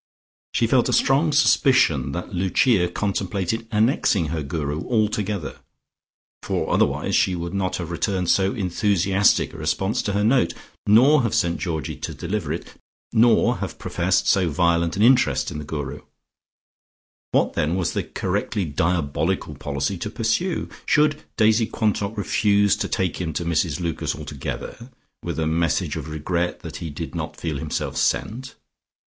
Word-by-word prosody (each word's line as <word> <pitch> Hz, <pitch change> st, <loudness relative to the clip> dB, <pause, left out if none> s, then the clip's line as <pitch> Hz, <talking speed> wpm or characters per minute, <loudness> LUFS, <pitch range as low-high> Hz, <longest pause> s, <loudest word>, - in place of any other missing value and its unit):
She -, -, +3 dB
felt -, -, +2 dB
a -, -, +1 dB
strong 145 Hz, +4 st, +3 dB
suspicion 130 Hz, -, +3 dB
that 90 Hz, +4 st, -5 dB
Lucia 95 Hz, +2 st, +2 dB
contemplated 100 Hz, +3 st, -2 dB
annexing 105 Hz, -, +2 dB
her 80 Hz, 0 st, -2 dB
Guru 75 Hz, +2 st, -3 dB
altogether, 105 Hz, -5 st, -1 dB, 0.8 s
for -, -, -2 dB
otherwise -, -, +1 dB
she 95 Hz, -, +2 dB
would 85 Hz, +1 st, -5 dB
not 95 Hz, -2 st, -1 dB
have 85 Hz, -1 st, -5 dB
returned 90 Hz, +1 st, -1 dB
so 95 Hz, +2 st, +3 dB
enthusiastic 100 Hz, -1 st, +2 dB
a -, -, -9 dB
response 80 Hz, +7 st, 0 dB
to 100 Hz, -, -2 dB
her 105 Hz, +1 st, +1 dB
note, 115 Hz, -4 st, +2 dB, 0.3 s
nor 130 Hz, +8 st, +6 dB
have 115 Hz, -2 st, -1 dB
sent 85 Hz, -6 st, +1 dB
Georgie 80 Hz, -6 st, -3 dB
to -, -, -6 dB
deliver 85 Hz, -3 st, -3 dB
it, 85 Hz, -, -5 dB, 0.4 s
nor 115 Hz, 0 st, +4 dB
have -, -, -5 dB
professed -, -, 0 dB
so 95 Hz, -3 st, +3 dB
violent 85 Hz, +2 st, +1 dB
an 105 Hz, -, +2 dB
interest 125 Hz, +2 st, +3 dB
in -, -, -5 dB
the -, -, -6 dB
Guru. 75 Hz, -2 st, -5 dB, 1.3 s
What -, -, +2 dB
then 80 Hz, +4 st, 0 dB
was 90 Hz, -3 st, -1 dB
the -, -, 0 dB
correctly 100 Hz, -, -2 dB
diabolical 80 Hz, +1 st, -1 dB
policy 70 Hz, +4 st, -3 dB
to 105 Hz, -, -3 dB
pursue? 125 Hz, -, -1 dB, 0.2 s
Should 150 Hz, 0 st, +3 dB, 0.2 s
Daisy 110 Hz, 0 st, +4 dB
Quantock 105 Hz, 0 st, -1 dB
refuse 100 Hz, 0 st, +2 dB
to -, -, -2 dB
take 95 Hz, -1 st, -1 dB
him 80 Hz, -3 st, -3 dB
to 85 Hz, -, -3 dB
Mrs 80 Hz, -3 st, 0 dB
Lucas 85 Hz, -3 st, -2 dB
altogether, 75 Hz, -, -7 dB, 0.3 s
with -, -, -4 dB
a 80 Hz, -, 0 dB
message 80 Hz, 0 st, 0 dB
of -, -, -5 dB
regret 85 Hz, +3 st, -2 dB
that -, -, -7 dB
he 85 Hz, -, -6 dB
did 80 Hz, +3 st, -6 dB
not 80 Hz, -2 st, -5 dB
feel 80 Hz, -5 st, -3 dB
himself 75 Hz, +1 st, -3 dB
sent? 130 Hz, +4 st, -1 dB
90 Hz, 155 wpm, -23 LUFS, 80-110 Hz, 1.3 s, nor